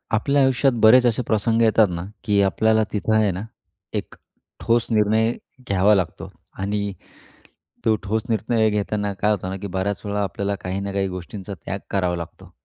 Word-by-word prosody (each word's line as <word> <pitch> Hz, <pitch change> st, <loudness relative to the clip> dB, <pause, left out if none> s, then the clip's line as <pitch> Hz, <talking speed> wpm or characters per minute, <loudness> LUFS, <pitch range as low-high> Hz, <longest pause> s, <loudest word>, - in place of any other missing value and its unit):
आपल्या 140 Hz, +6 st, +2 dB
आयुष्यात 130 Hz, 0 st, +3 dB
बरेच 125 Hz, +3 st, +7 dB
असे 120 Hz, 0 st, +2 dB
प्रसंग 110 Hz, +1 st, +1 dB
येतात 110 Hz, -1 st, +5 dB
ना, 85 Hz, 0 st, -4 dB, 0.2 s
की 100 Hz, -1 st, +2 dB
आपल्याला 110 Hz, +3 st, +2 dB
तिथं 110 Hz, +1 st, 0 dB
आहे 110 Hz, -2 st, +3 dB
ना, 90 Hz, +1 st, -5 dB, 0.5 s
एक -, -, -4 dB, 0.4 s
ठोस 115 Hz, 0 st, +1 dB
निर्णय 110 Hz, +1 st, +3 dB, 0.4 s
घ्यावा 100 Hz, +2 st, +4 dB
लागतो. 90 Hz, -4 st, -3 dB, 0.3 s
आणि 100 Hz, +1 st, -2 dB, 0.9 s
तो 110 Hz, -, +4 dB
ठोस 110 Hz, +2 st, -1 dB
निर्णय 110 Hz, 0 st, +1 dB
घेताना 105 Hz, -1 st, -1 dB
काय 105 Hz, +2 st, 0 dB
होतं 95 Hz, -3 st, -2 dB
ना 95 Hz, -, -4 dB
की 100 Hz, -, -4 dB
बऱ्याच 95 Hz, +2 st, -1 dB
वेळा 105 Hz, 0 st, -1 dB
आपल्याला 100 Hz, +1 st, -2 dB
काही 95 Hz, +1 st, -3 dB
ना 100 Hz, 0 st, -4 dB
काही 100 Hz, 0 st, 0 dB
गोष्टींचा 95 Hz, +2 st, -7 dB
त्याग 100 Hz, -, -3 dB
करावा 90 Hz, -3 st, 0 dB
लागतो 85 Hz, -1 st, -9 dB
105 Hz, 170 wpm, -22 LUFS, 100-110 Hz, 0.9 s, बरेच